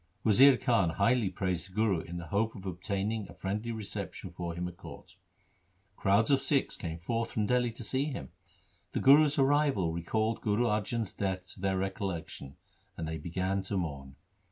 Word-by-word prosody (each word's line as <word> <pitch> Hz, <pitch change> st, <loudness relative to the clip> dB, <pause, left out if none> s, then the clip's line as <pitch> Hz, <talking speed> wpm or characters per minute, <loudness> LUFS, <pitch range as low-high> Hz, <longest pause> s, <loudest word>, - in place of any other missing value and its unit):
Wazir 130 Hz, +5 st, +7 dB
Khan 115 Hz, -10 st, +2 dB
highly 105 Hz, +5 st, +2 dB
praised 90 Hz, -1 st, -2 dB
the 95 Hz, -, -18 dB
Guru 105 Hz, -5 st, +2 dB
in 85 Hz, +1 st, -7 dB
the 85 Hz, -, -6 dB
hope 105 Hz, +7 st, 0 dB
of 100 Hz, -2 st, -10 dB
obtaining 100 Hz, +3 st, -3 dB
a -, -, -12 dB
friendly 105 Hz, +4 st, -3 dB
reception 110 Hz, -3 st, -6 dB
for 85 Hz, -1 st, -5 dB
him 90 Hz, +1 st, -3 dB
at 90 Hz, -, -8 dB
court. -, -, -12 dB, 0.8 s
Crowds 100 Hz, +7 st, +3 dB
of 135 Hz, -1 st, +4 dB
Sikhs 140 Hz, -3 st, +1 dB
came 80 Hz, -3 st, -5 dB
forth 115 Hz, +7 st, -2 dB
from 105 Hz, -, -1 dB
Dihli 125 Hz, +1 st, +2 dB
to 120 Hz, -, -7 dB
see 130 Hz, +5 st, 0 dB
him. 130 Hz, -, -5 dB, 0.6 s
The -, -, 0 dB
Guru's 145 Hz, +2 st, +6 dB
arrival 135 Hz, -, +3 dB
recalled 110 Hz, +7 st, -1 dB
Guru 105 Hz, +2 st, +1 dB
Arjan's 110 Hz, 0 st, -1 dB
death 95 Hz, -2 st, -2 dB
to -, -, -16 dB
their 95 Hz, -1 st, +1 dB
recollection 95 Hz, -7 st, -4 dB, 0.4 s
and 80 Hz, -, -3 dB
they 80 Hz, 0 st, -4 dB
began 95 Hz, +5 st, -1 dB
to 95 Hz, +1 st, -3 dB
mourn. 70 Hz, -6 st, -4 dB
100 Hz, 180 wpm, -31 LUFS, 90-115 Hz, 0.8 s, Wazir